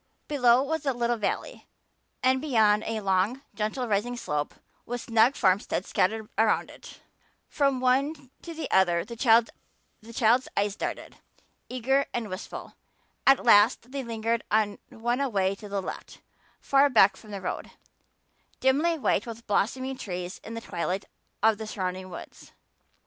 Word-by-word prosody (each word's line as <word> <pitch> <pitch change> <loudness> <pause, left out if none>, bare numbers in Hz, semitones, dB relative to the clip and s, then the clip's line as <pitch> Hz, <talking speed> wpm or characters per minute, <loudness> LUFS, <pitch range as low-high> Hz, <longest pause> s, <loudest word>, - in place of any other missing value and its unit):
Below 250 -3 +4
was 315 +1 -3
a 270 - +2
little 240 0 0
valley 210 - -3 0.6
and 260 0 +3
beyond 220 -7 +3
a 220 -1 -2
long, 195 +7 0
gently 215 +4 -2
rising 230 +3 -1
slope 150 -9 -3 0.3
with 245 0 -5
snug 230 +4 +3
farmsteads 190 0 +1
scattered 220 +3 0
along 220 -1 +2
it. - - -13 0.5
From 275 -3 +1
one 265 +2 0
to 330 -2 -6
another 175 -3 +3
the 235 +2 -8
child's 230 0 +1
eyes 200 0 +1
darted, - - -5 0.5
eager 265 +3 +1
and 230 -3 -3
wistful. 185 +3 -7 0.5
At 270 -1 +5
last 230 +2 +5
they 275 -1 -4
lingered 230 0 -2
on 210 -1 +1
one 240 +3 -2
away 200 -8 +1
to 205 +1 -10
the 200 -1 -2
left, - - -8 0.4
far 275 +1 +4
back 205 -6 +5
from 215 - -15
the 200 -1 -5
road, 185 - -5 0.9
dimly 300 +6 +2
white 270 - 0
with 230 0 -8
blossoming 260 +6 -1
trees 180 -1 -5
in 225 - -7
the 230 - -5
twilight 185 -1 -3 0.4
of 220 -1 +4
the 220 - -5
surrounding 185 -2 -4
woods. 175 - -11
230 Hz, 145 wpm, -27 LUFS, 205-260 Hz, 0.9 s, At